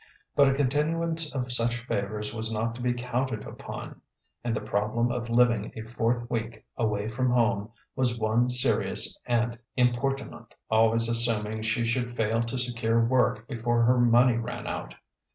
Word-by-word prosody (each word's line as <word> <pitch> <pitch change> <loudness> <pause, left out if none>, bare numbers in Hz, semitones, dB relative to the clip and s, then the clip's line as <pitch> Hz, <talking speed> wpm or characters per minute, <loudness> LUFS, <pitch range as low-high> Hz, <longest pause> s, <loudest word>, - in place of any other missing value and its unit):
But 140 -1 +6
a 135 - +1
continuance 155 +4 0
of 125 -2 -2
such 120 0 -1
favours 105 -1 -3
was 110 0 -4
not 110 +1 -1
to 120 - -9
be 125 0 +1
counted 125 -2 -2
upon; - - -8 0.4
and 120 -2 -1
the - - -1
problem 110 +3 -1
of 120 0 -4
living 115 -3 +2
a 110 - -6
fourth 120 +1 -1
week 115 -2 -4
away 105 -2 -1
from 125 +3 -1
home 115 -4 +1 0.3
was 125 -2 +1
one 115 +2 +1
serious 125 -3 +1
and 120 -1 0 0.2
importunate 130 +2 -1 0.2
always 115 +1 +4
assuming 110 -2 +4
she 110 +2 0
should 120 +1 -1
fail 110 +1 +1
to 115 +2 -3
secure 115 -2 +1
work 120 -2 +1
before 120 -2 0
her 125 +1 +4
money 120 0 +4
ran 115 - -5
out. - - -5
120 Hz, 160 wpm, -27 LUFS, 110-125 Hz, 0.4 s, But